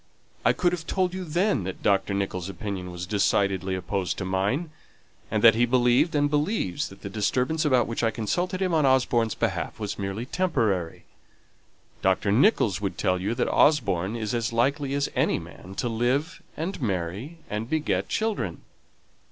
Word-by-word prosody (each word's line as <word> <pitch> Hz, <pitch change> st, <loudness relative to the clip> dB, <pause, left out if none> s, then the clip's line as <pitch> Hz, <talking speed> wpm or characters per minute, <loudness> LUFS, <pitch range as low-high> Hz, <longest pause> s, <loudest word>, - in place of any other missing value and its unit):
I -, -, +5 dB
could 175 Hz, -, +1 dB
have 170 Hz, -3 st, -4 dB
told 185 Hz, -2 st, 0 dB
you 185 Hz, 0 st, -4 dB
then 175 Hz, -, +1 dB
that 95 Hz, -, -6 dB
Dr. 100 Hz, 0 st, +2 dB
Nicholls' 95 Hz, -2 st, -2 dB
opinion 95 Hz, -1 st, -5 dB
was 90 Hz, 0 st, -6 dB
decidedly 95 Hz, -1 st, +1 dB
opposed 95 Hz, +1 st, -2 dB
to 95 Hz, -, -3 dB
mine, 100 Hz, -, -1 dB, 0.6 s
and 110 Hz, -1 st, -1 dB
that 115 Hz, -1 st, +9 dB
he 120 Hz, +3 st, +2 dB
believed 125 Hz, +5 st, +3 dB
that 145 Hz, -, 0 dB
the -, -, -4 dB
disturbance 125 Hz, +10 st, 0 dB
about 130 Hz, -5 st, +4 dB
which 115 Hz, -, -3 dB
I 115 Hz, -, +4 dB
consulted 175 Hz, -, -1 dB
him 185 Hz, -2 st, 0 dB
on 155 Hz, -2 st, +3 dB
Osborne's 125 Hz, -4 st, +2 dB
behalf -, -, -2 dB
was 105 Hz, -1 st, -4 dB
merely 100 Hz, +4 st, -3 dB
temporary. 115 Hz, -, -1 dB, 1.0 s
Dr. 100 Hz, -, +2 dB
Nicholls 110 Hz, -, +3 dB
would 100 Hz, -2 st, -3 dB
tell 90 Hz, -2 st, +1 dB
you 105 Hz, +5 st, -1 dB
that 125 Hz, -, 0 dB
Osborne 105 Hz, -, +3 dB
is 110 Hz, -2 st, -3 dB
as 115 Hz, -1 st, -1 dB
likely 140 Hz, +4 st, +1 dB
as 140 Hz, 0 st, +1 dB
any -, -, +2 dB
man 95 Hz, +1 st, -10 dB
to 120 Hz, -, -1 dB
live 130 Hz, +9 st, 0 dB, 0.2 s
and 165 Hz, +2 st, -4 dB
marry 100 Hz, -, -3 dB
and 105 Hz, +3 st, -4 dB
beget 155 Hz, -1 st, 0 dB
children." 220 Hz, -1 st, -2 dB
115 Hz, 165 wpm, -26 LUFS, 100-150 Hz, 1.0 s, that